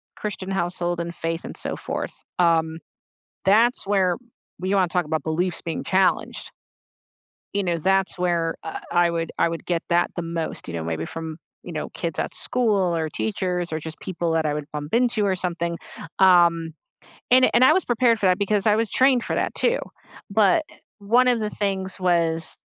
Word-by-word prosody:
Christian 195 -2 -5
household 175 -1 -1
and 170 0 -4
faith 165 0 -3
and - - -8
so - - -4
forth, - - -5 0.2
um, 165 -2 +2 0.7
that's 225 +5 +4
where 190 -3 +2 0.5
you 190 +2 0
wanna 190 -2 +3
talk 175 0 0
about 155 +1 -2
beliefs 170 +2 -1
being 165 - -4
challenged. 190 0 +1 1.0
You 200 0 0
know, 175 -2 0
that's 190 +3 +1
where, 170 -2 0
uh, 160 - -5
I 175 0 +4
would 165 -1 -2
I - - +3
would 165 0 -6
get 170 -1 -1
that 175 0 +2
the 175 - -2
most, 165 -1 -4
you 85 - -6
know, 85 -1 -3
maybe 80 0 -3
from, 160 - -6 0.3
you 180 - -8
know, 155 -2 -4
kids 165 -2 -4
at - - -2
school 205 -8 +1
or 160 -1 -1
teachers 175 - -2
or 155 - -2
just 160 0 -8
people 170 -2 -3
that 160 -1 +1
I 150 - +1
would 150 -1 -4
bump 150 0 -5
into 235 -3 +2
or 190 -1 +1
something. 170 -2 -2 0.4
Um. 170 -3 +5 0.6
And 255 +1 +6
and 240 - +4
I 260 - +7
was 375 - +1
prepared 240 -1 +2
for 210 - -3
that 185 0 +3
because 205 0 0
I 210 - +5
was 225 -1 0
trained 255 -2 +4
for - - -2
that - - -1
too. - - +1 0.5
But, 220 - +3
uh, - - -17 0.2
one 235 +5 +3
of 245 -2 +2
the 210 -1 -2
things 190 -2 -2
was 165 -2 +1
175 Hz, 195 wpm, -23 LUFS, 165-200 Hz, 1.0 s, I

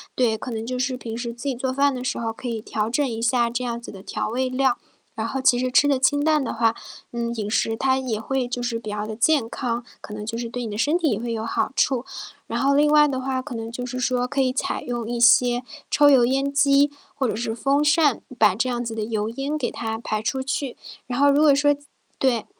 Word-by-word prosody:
对， 235 -3 +2
可 255 - -7
能 225 -1 -4
就 250 +1 -3
是 255 0 -1
平 230 -3 -6
时 235 -1 -4
自 240 +1 -11
己 275 -3 -1
做 260 +1 -2
饭 280 +1 +2
的 250 -1 -5
时 255 - -2
候 225 -1 -2
可 250 - -8
以 230 -2 -2
调 215 0 -2
整 280 +4 +1
一 230 -2 -4
下 235 0 +2
这 245 +1 -2
样 235 -1 -3
子 235 - -9
的 195 - -11
调 205 - -3
味 255 +3 -1
料， 255 -1 +1 0.4
然 225 0 -3
后 270 - -3
其 255 -2 +4
实 255 0 -1
吃 285 - +5
的 275 -2 +2
清 285 +2 +2
淡 305 -2 +3
的 250 - -3
话， 225 0 +2 0.4
嗯， 235 0 -2
饮 210 -2 -3
食 225 +1 +1
它 265 -1 +2
也 235 -5 -2
会 260 +2 -1
就 245 0 -4
是 235 -1 -2
比 215 - -7
较 210 0 -3
的 220 - -5
健 270 +1 +2
康， 240 0 -3 0.2
可 - - -10
能 210 0 -6
就 225 +1 -4
是 235 -1 -4
对 245 0 -4
你 220 - -5
的 205 - -5
身 295 +8 +2
体 325 -6 +1
也 210 - -1
会 235 0 -4
有 225 0 -3
好 - - -1
处。 260 -3 +2 0.4
然 - - -2
后 275 +1 +3
另 295 +1 +4
外 300 0 +6
的 265 -2 -2
话 260 0 -2
可 250 - -7
能 225 0 -5
就 245 +1 -5
是 255 +1 -4
说 250 0 0
可 275 - -3
以 255 -1 +2
采 260 - -2
用 240 -2 -4
一 240 -1 -2
些 245 +1 +5 0.3
抽 290 0 +5
油 255 -3 +6
烟 275 +2 0
机 280 0 +4 0.2
或 265 -3 0
者 210 - -1
是 225 0 -3
风 275 +4 +1
扇， 295 -3 +3 0.2
把 210 -3 +5
这 245 +6 -1
样 240 0 -2
子 230 -1 -4
的 220 -1 -3
油 215 -1 -2
烟 275 +5 -3
给 255 -5 -2
它 225 -1 -4
排 215 -1 -3
出 260 +4 -2
去。 270 -1 -3 0.3
然 245 +1 -3
后 285 0 +6
如 290 +2 +3
果 290 -3 +6
说 290 0 +3 0.4
对， 245 -5 +1
245 Hz, 285 characters per minute, -23 LUFS, 230-270 Hz, 0.4 s, 外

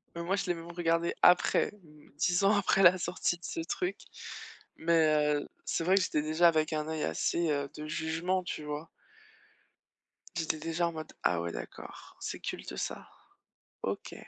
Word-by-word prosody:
Mais 170 - -4
moi, 190 +3 +1
je 195 - -2
l'ai 180 - +1
même 170 0 -8
regardée 170 -1 +1
après, 180 - +5 0.5
10 180 +5 +2
ans 200 +2 +5
après 195 -1 +3
la 180 0 +8
sortie 175 0 -1
de 175 - -25
ce - - -4
truc. 370 +1 -2 0.8
Mais 155 -3 +3
heu, - - -7 0.2
c'est - - -1
vrai 185 +3 +4
que 195 - +4
j'étais 150 -4 +1
déjà 155 +3 +4
avec 155 -1 +2
un 155 0 -1
œil 160 -1 -2
assez, 165 - 0
heu, 140 -1 -1
de 150 0 -6
jugement, 165 +4 -1
tu 155 - -5
vois? 150 +2 -5 1.5
J'étais 160 -1 -1
déjà 165 +2 0
en - - -6
mode: 155 -1 -7
«Ah 90 - +3
ouais, 85 0 -3
d'accord, - - -9
c'est - - -5
culte - - -5
ça? - - -4 0.8
OK.» - - -3
165 Hz, 175 wpm, -31 LUFS, 155-175 Hz, 1.5 s, la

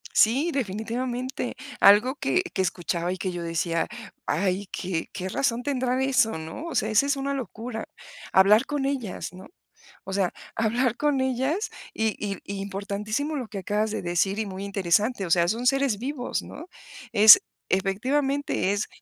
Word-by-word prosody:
Sí, 270 +10 +4
definitivamente. 245 - -3 0.2
Algo 215 +7 +6
que 365 - +1
que 190 - 0
escuchaba 175 -1 -1
y - - -6
que 185 0 -3
yo 175 -1 -5
decía: 165 0 -1 0.4
"Ay, 190 +5 0
que 175 -3 -3
que 185 -1 -4
razón 240 +3 0
tendrá 255 -2 0
eso", 255 -7 +2
¿no?, 160 - -7
o 335 - -5
sea, 215 - +1
esa 220 +5 +4
es 285 +1 +1
una 275 0 -2
locura, 235 -3 -5 0.5
hablar 210 +6 +6
con 290 -2 -2
ellas, 260 -8 -3
¿no?, 185 +1 -11 0.6
o 190 - -6
sea, 190 -2 0 0.2
hablar 235 +2 +1
con 290 -3 +1
ellas, 265 - 0 0.2
y 220 -1 0
i 200 -2 -3 0.2
importantísimo 205 +8 -3
lo 250 -4 -4
que 205 -2 -6
acabas 210 +3 -1
de 220 - -3
decir 175 +3 0
y 220 - 0
muy 190 -1 -6
interesante, 200 +3 +1
o - - -6
sea, 170 0 +4
son 230 +6 -1
seres 270 -4 +2
vivos, 255 +2 -3
¿no?, 330 - -10 0.5
es 215 0 +10 0.3
efectivamente 255 +5 0
es 205 +1 -1
220 Hz, 165 wpm, -26 LUFS, 190-260 Hz, 0.6 s, es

